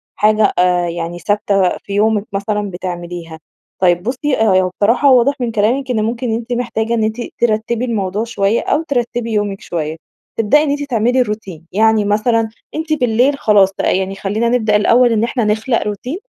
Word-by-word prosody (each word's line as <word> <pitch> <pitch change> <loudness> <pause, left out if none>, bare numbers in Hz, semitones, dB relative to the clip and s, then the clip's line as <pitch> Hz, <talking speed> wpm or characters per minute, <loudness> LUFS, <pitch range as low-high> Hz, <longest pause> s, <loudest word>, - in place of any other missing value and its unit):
حاجة 215 0 +3
آآ 180 -1 +2
يعني 170 0 -5
ثابتة 200 -2 +1
في 200 - -9
يومك 210 0 +1
مثلًا 205 +1 -2
بتعمليها. 175 -2 -6 0.4
طيب 175 -1 +3
بُصي، 265 +4 -1
ه - - -3 0.2
هو 185 - -1
بصراحة 245 +6 +4
واضح 255 +2 +4
من 240 -2 -2
كلامك 245 +5 0
إن 215 -3 0
ممكن 230 +1 -2
أنتِ 235 +2 -3
محتاجة 235 -1 -2
إن 225 -2 +1
أنتِ 220 +2 -1 0.2
ترتبي 230 +1 0
الموضوع 210 -2 -2
شويّة 210 -1 0
أو 315 - 0
ترتبي 240 -5 -2
يومك 205 -2 -1
شويّة. 160 -2 -4 0.4
تبدئي 225 +7 +3
إن 305 - -1
أنتِ 290 0 -2
تعملي 245 -1 +1
الروتين. 205 -8 -5
يعني 220 +1 +3
مثلًا، 220 +2 +1 0.3
أنتِ 315 0 -2
بالليل 255 +1 +2
خلاص 205 -5 +4
بقى - - +2
يعني 190 0 -3
خلينا 210 +4 -1
نبدأ 220 -4 +1
الأول 235 +3 +4
إن 220 0 +1
إحنا 240 0 -1
نخلق 220 +3 0
روتين، 245 - -4
220 Hz, 175 wpm, -16 LUFS, 200-240 Hz, 0.4 s, بصراحة